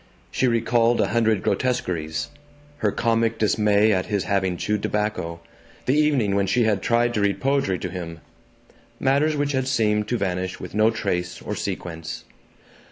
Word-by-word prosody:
She 130 - +1
recalled 115 0 +2
a - - +2
hundred 110 -3 +2
grotesqueries: 80 - -1 0.5
her 105 - +1
comic 115 0 +1
dismay 105 0 +3
at 95 -2 0
his 100 -2 0
having 95 -3 0
chewed 105 +2 -1
tobacco, 105 -6 -2 0.4
the 130 - +2
evening 145 -9 +2
when 100 0 +1
she 120 +5 +2
had 105 -3 +1
tried 120 +2 +2
to 105 - 0
read 100 -1 +1
poetry 135 -9 +1
to - - -5
him; 85 -3 -6 0.8
matters 140 +3 +2
which 145 0 0
had 130 -2 -1
seemed 105 -5 +1
to 120 - 0
vanish 95 -2 -2
with - - -8
no 110 +2 +4
trace 90 -5 -2
or - - -5
sequence. 80 -2 -5
105 Hz, 165 wpm, -23 LUFS, 95-120 Hz, 0.8 s, no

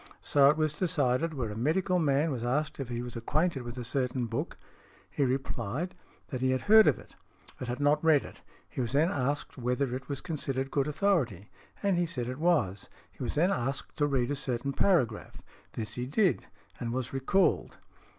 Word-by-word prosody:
So 140 -1 +5
it 150 - +3
was 155 -1 +1
decided 160 -2 0
where 120 -6 -2
a - - -6
medical 180 - +1
man 150 0 +2
was 120 -4 -3
asked 145 +6 -1
if 135 -3 -4
he 120 0 -3
was 120 -1 -7
acquainted 145 +5 0
with 120 +1 -7
a 125 - -4
certain 125 0 -1
book; 115 - -4 0.5
he 145 - 0
replied, 130 - -2 0.4
that 130 -4 -4
he 130 - +2
had 130 0 +1
heard 220 +1 +7
of - - +4
it, - - -15 0.4
but 125 - -5
had 125 +2 -3
not 145 +2 +2
read 155 -3 +4
it. - - -12 0.3
He - - -4
was 120 0 -2
then 155 +6 +3
asked 145 0 -2
|101| - - -8
whether 125 +1 0
it 135 - -7
was 140 -2 -2
considered 135 -5 -3
good 140 0 +1
authority, 145 - 0 0.3
and 200 -3 +2
he 175 - +1
said 125 -7 -3
it 130 +2 -5
was. 150 - +1 0.2
He - - -16
was 120 - -2
then 175 +6 +3
asked 135 -2 -3
to 145 - +2
read 135 -2 0
a - - 0
certain 135 -1 -2
paragraph; 130 - +1 0.3
this 110 -1 -4
he 125 0 -3
did, 185 +6 +1 0.3
and 120 -2 -3
was 130 +1 -3
re 135 - -1
called. 190 +9 +1
135 Hz, 210 wpm, -30 LUFS, 125-155 Hz, 0.5 s, heard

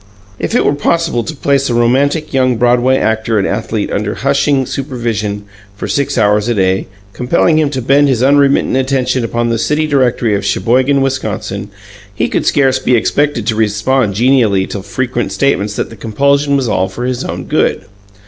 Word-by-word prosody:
If - - -2
it - - +2
were - - +3
possible 155 -3 0
to 160 - -6
place 140 -1 0
a 120 - 0
romantic 140 +7 +1
young 130 -2 +2
Broadway 125 +2 +2
actor 110 -1 0
and 100 - +1
athlete 110 0 -3
under 105 0 -2
hushing 140 0 +1
supervision 115 -7 -3 0.3
for - - -5
six 140 -2 -1
hours 105 -1 +2
a 120 - 0
day, 95 -1 0 0.3
compelling 155 +5 +1
him 155 -2 +1
to 130 -3 -4
bend 140 +3 +3
his 130 -3 +1
unremittent 140 -1 +3
attention 130 -1 0
upon 120 0 -1
the 115 -1 -1
city 150 +5 0
directory 125 -6 +1
of 100 - -1
Sheboygan, 130 +7 +1
Wisconsin, 110 -6 -3 0.5
he - - -1
could - - -1
scarce 135 -2 +2
be 125 -1 +1
expected 140 0 0
to 115 - 0
respond 110 +1 0
genially 115 -5 +2
to 100 - -5
frequent 120 +1 -3
statements 105 -6 0
that - - -3
the - - -10
compulsion 140 +7 +1
was 130 -3 -1
all 95 -3 0
for 120 - -5
his 125 -1 -2
own - - -5
good. - - 0
125 Hz, 180 wpm, -14 LUFS, 110-140 Hz, 0.5 s, were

